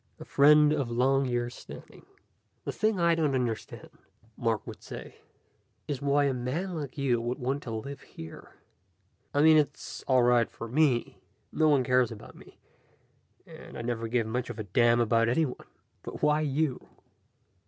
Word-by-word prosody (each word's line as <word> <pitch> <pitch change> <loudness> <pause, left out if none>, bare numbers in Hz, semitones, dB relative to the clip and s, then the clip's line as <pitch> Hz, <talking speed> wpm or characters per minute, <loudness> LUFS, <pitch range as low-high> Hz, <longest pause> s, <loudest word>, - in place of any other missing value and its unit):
A - - -9
friend 150 +1 +5
of 140 -5 -1
long 135 +3 +2
years' 120 -1 -2
standing. - - -12 0.6
"The - - -2
thing 215 -2 0
I 170 0 +4
don't 155 -4 +1
understand," 120 -4 -4 0.4
Mark 115 -3 -1
would - - -9
say, - - -10 0.7
"is 140 -4 -3
why 140 0 +2
a 140 -1 +1
man 135 +10 -3
like 145 -4 -6
you 130 -4 +1
wants 125 +4 -3
to 120 - -5
live 140 +6 -6
here. 80 0 -12 0.8
I 145 - +2
mean, 160 0 +7
it's 150 -2 -2
all 130 -2 +4
right 120 -1 +3
for 115 - -8
me. 130 -1 +1 0.3
No 155 -1 +3
one 140 -3 +4
cares 125 -2 +2
about 110 - -10
me, - - -17 0.9
and - - -12
I - - -5
never 115 -1 -2
gave 115 0 0
much 120 +3 -3
of 120 - -6
a 110 - -4
damn 120 +4 +3
about 115 0 +2
anyone. 130 +1 -1 0.3
But - - -9
why 150 +1 +3
you?" 150 -2 0
130 Hz, 165 wpm, -28 LUFS, 120-145 Hz, 0.9 s, mean